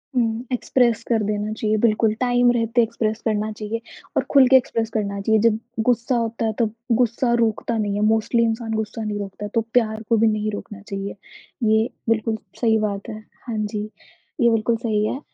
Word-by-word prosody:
हुँ, 230 -1 0
express 245 -2 +1
कर 225 -3 +1
देना 210 +1 -2
चाहिए, 215 0 0
बिल्कुल 220 -1 +3
टाइम 245 -1 +3
रहते 235 0 +2
एक्सप्रेस 220 -1 -2
करना 215 -1 0
चाहिए 215 +2 -5 0.4
और - - +3
खुल 275 -3 +7
के 265 - +6
एक्सप्रेस 230 -3 -1
करना 200 -2 -2
चाहिए, 220 +2 +3
जब 225 -1 +3 0.3
गुस्सा 245 +1 +1
होता 230 -1 -1
है 220 - 0
तब 220 -3 +1 0.3
गुस्सा 235 +1 +1
रोकता 230 0 0
नहीं 205 -2 -1
है, 205 - -1
मोस्टली 225 +2 +2
इंसान 225 0 -1
गुस्सा 220 +1 -3
नहीं 210 -1 -3
रोकता, 200 +1 -6
तो 225 +2 0
प्यार 220 -3 +2
को 230 - +4
भी 225 +1 +4
नहीं 215 0 0
रोकना 205 0 -7
चाहिए, 195 0 -4 0.5
ये 220 +1 +3 0.2
बिल्कुल 225 0 +1 0.3
सही 225 -2 +4
बात 205 0 -3
है। 215 -1 -6 0.3
हाँ 230 -2 -3
जी, 210 0 -2 0.6
ये 235 - +6
बिल्कुल 225 0 +1
सही 215 -3 0
है 260 - -3
220 Hz, 190 wpm, -22 LUFS, 215-235 Hz, 0.6 s, खुल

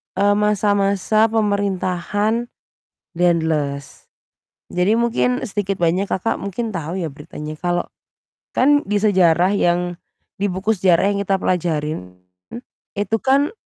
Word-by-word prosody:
eee, 205 +1 +3
masa-masa 210 +1 +2
pemerintahan 205 +1 0 0.7
Daendels. 160 -5 -1 0.7
Jadi 185 +5 +2
mungkin 235 +1 +1
sedikit 200 -2 -2
banyak 175 +3 +1
Kakak 205 +5 -1
mungkin 215 +3 -4
tahu 165 +1 -4
ya 170 -4 -2
beritanya 150 +1 -8
kalau 175 0 0 0.7
kan 290 +3 +3
di 205 +1 0
sejarah 185 -2 +3
yang 175 -1 +1 0.4
di 200 0 -1
buku 190 +5 0
sejarah 185 -1 +3
yang 200 - -1
kita 195 -1 0
pelajarin 155 - -2 0.8
itu 205 +2 0
kan 275 +2 +3
195 Hz, 115 wpm, -20 LUFS, 175-210 Hz, 0.8 s, eee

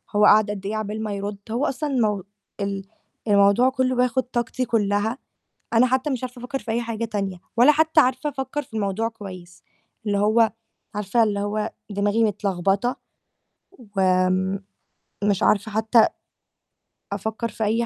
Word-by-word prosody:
هو 210 0 +5
قاعد 210 0 +6
قد 195 -2 -6
إيه 210 +2 -2
عقبال 215 0 -3
ما 210 -1 -3
يرُد، 200 +1 -4
هو 245 +6 0
أصلًا 290 +2 -2
المو 215 -7 +1 0.4
ال 200 -1 -2 0.4
الموضوع 200 +5 +5
كلّه 260 -1 0
بياخُد 250 +1 +2
طاقتي 245 +1 -2
كلّها، 215 +1 0 0.6
أنا 235 +2 +5
حتّى 260 +3 0
مش 255 -1 -2
عارفة 250 0 -7
أفكّر 250 +3 -4
في 230 - -7
أي 235 +2 0
حاجة 230 -1 -3
تانية، 195 -5 -3 0.2
ولا 250 +6 +7
حتّى 315 +1 +4
عارفة 260 +2 +1
أفكّر 270 +2 -4
في 245 -5 -17
الموضوع 215 +1 -1
كويس، 185 -5 -11 0.4
اللي 205 -1 +1
هو 220 +2 +3 0.4
عارفة 210 +3 +1
اللي 205 -2 +1
هو 210 +2 -2 0.2
دماغي 205 +3 +1
متلخبطة، 200 +2 0 1.0
وآمم 185 +1 +2 0.6
مش 200 -2 +1
عارفة 205 +1 +2
حتّى 220 +1 +4 1.1
أفكّر 220 +3 -3
في 220 - -4
أي 225 +3 +1
220 Hz, 155 wpm, -23 LUFS, 200-245 Hz, 1.1 s, ولا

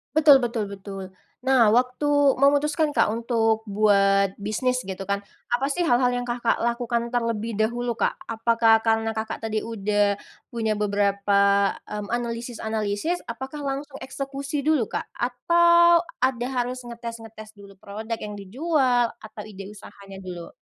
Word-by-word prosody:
Betul 300 -3 +7
betul 235 -3 -2
betul, 195 0 -7 0.4
nah 260 -4 +4
waktu 250 +4 +1 0.3
memutuskan, 290 +2 +2
Kak, - - +3
untuk 225 -1 0
buat 200 -1 +3
bisnis 250 +5 -1
gitu 190 0 -5
kan 200 +1 -1 0.3
apa 245 +3 +1
sih 320 +5 -1
hal-hal 250 -5 +3
yang, 245 - -2
Kakak, 240 -1 0
lakukan 235 0 -1
terlebih 230 -2 -1
dahulu, 240 +2 0
Kak. - - +1
Apakah 230 0 +3
karena, 225 0 +1
Kakak, 220 0 -5
tadi 220 -1 -1
udah 205 -2 0 0.3
punya 225 -2 -2
beberapa, 200 -1 +2
mmm, 210 -1 -6
analisis-analisis 230 +3 -3
apakah 265 +5 -6
langsung 275 0 -5
eksekusi 275 +1 -5
dulu, 300 -8 +2
Kak? - - -3 0.2
Atau 340 +7 +4 0.2
ada 250 -2 +1
harus 250 -1 -2
ngetes-ngetes 230 -2 -9
dulu 200 -2 -15
produk 215 +4 -6
yang 210 -2 -7
dijual 250 - +1
atau 215 -1 -10
ide 200 -2 -9
usahanya 200 -1 -12
dulu? 175 -2 -7
230 Hz, 135 wpm, -24 LUFS, 210-255 Hz, 0.4 s, Betul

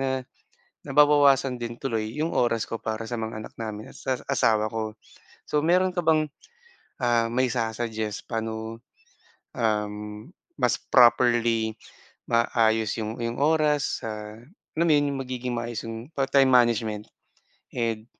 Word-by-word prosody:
na 130 -1 -1 0.6
nababawasan 140 -2 +4
din 120 0 -5
tuloy 110 -4 -2
'yong 155 +2 -1
oras 115 -2 0
ko 115 - -3
para 110 +1 -4
sa 120 - -3
mga 110 -1 -4
anak - - -10
namin 110 -1 -6
at - - -14
sa 130 -1 -2
asawa 110 -3 +2
ko. 110 -1 -4 0.5
So 150 - 0
meron 180 +3 +3
ka 180 - -1
bang 160 -2 +3 1.1
mai-su-suggest, 115 -3 -2
paano, 110 0 -4 0.7
um, 105 +2 -3 0.3
mas - - +1
properly 120 -2 +4 0.5
maaayos 115 -2 +2
yung 110 +2 -4
yung 115 +1 -3
oras 150 -1 +2
sa 105 -1 -6 0.4
alam 170 +1 +3
yun 145 -1 +3
yung 135 - -3
magiging 125 -1 -4
maayos 115 -1 -4
yung 115 +5 -7
pa 135 -4 -1
time 135 -1 +4
management 115 -4 +2 0.7
and 115 -2 -2
115 Hz, 130 wpm, -26 LUFS, 110-135 Hz, 1.1 s, nababawasan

